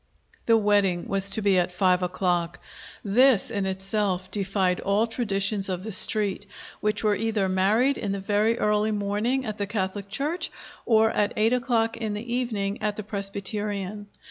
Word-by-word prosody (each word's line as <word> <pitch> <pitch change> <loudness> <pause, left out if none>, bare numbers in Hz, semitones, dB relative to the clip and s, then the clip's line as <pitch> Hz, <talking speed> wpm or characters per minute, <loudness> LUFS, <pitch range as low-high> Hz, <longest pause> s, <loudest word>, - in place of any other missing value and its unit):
The 230 -1 +6
wedding 205 -4 +2
was 195 0 0
to 215 +2 -2
be 195 -2 +4
at 180 0 0
five 180 0 +2
o'clock. 175 -1 -1 0.5
This, 230 +1 +4
in 200 -3 -1
itself, 190 -1 -2
defied 195 -2 0
all 200 +3 +1
traditions 200 -4 -2
of 185 -1 -3
the 220 - -5
Street, 205 0 0 0.3
which 210 +1 -1
was 210 -1 +2
either 220 -3 0
married 210 +9 +2
in 205 -4 -2
the 200 - -2
very 210 +3 +1
early 210 0 +1
morning 210 +5 -1
at 215 -1 -5
the 200 - -1
Catholic 200 -1 -3
church 290 - -2 0.4
or 220 -1 +4
at 205 - 0
eight 220 +3 +3
o'clock 235 -3 +1
in 220 -3 -3
the 235 +3 -5
evening 215 -5 -2
at 210 -1 -1
the 215 - -5
Presbyterian. 205 0 -3
205 Hz, 170 wpm, -25 LUFS, 195-220 Hz, 0.5 s, The